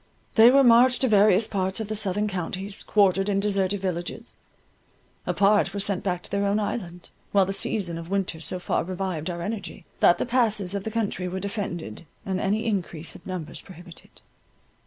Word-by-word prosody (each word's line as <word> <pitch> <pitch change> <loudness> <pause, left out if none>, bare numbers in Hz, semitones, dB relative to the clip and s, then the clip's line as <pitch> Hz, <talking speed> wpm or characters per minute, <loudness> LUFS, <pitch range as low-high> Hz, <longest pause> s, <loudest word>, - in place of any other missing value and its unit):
They 225 +1 +8
were 275 +2 +5
marched 245 +1 +5
to 260 - +4
various 210 -1 +4
parts 190 -2 -1
of 220 - -3
the 215 - -3
southern 205 0 0
counties, 190 +1 -4
quartered 195 -1 +2
in 195 -1 +1
deserted 200 -1 0
villages,—a 175 -2 -7
part 205 +1 +3
were - - -2
sent 200 -1 -1
back 180 -2 -2
to - - -10
their 200 0 0
own 205 +2 +1
island, 180 -5 -5 0.2
while 195 -2 +4
the 195 - -3
season 185 -4 -2
of 165 0 -9
winter 195 -4 -1
so 175 +3 -1
far 180 - -1
revived 185 -2 -4
our 170 -1 -4
energy, 200 -3 -6
that 175 - +5
the - - -1
passes 220 -6 +1
of 200 -1 -4
the - - -1
country 210 -4 -2
were 185 +1 -4
defended, 175 - -5 0.2
and 190 -1 -2
any 210 +3 0
increase 175 -7 -3
of 180 - -13
numbers 180 -4 -6
prohibited. 175 -2 -13
195 Hz, 185 wpm, -25 LUFS, 180-210 Hz, 0.2 s, They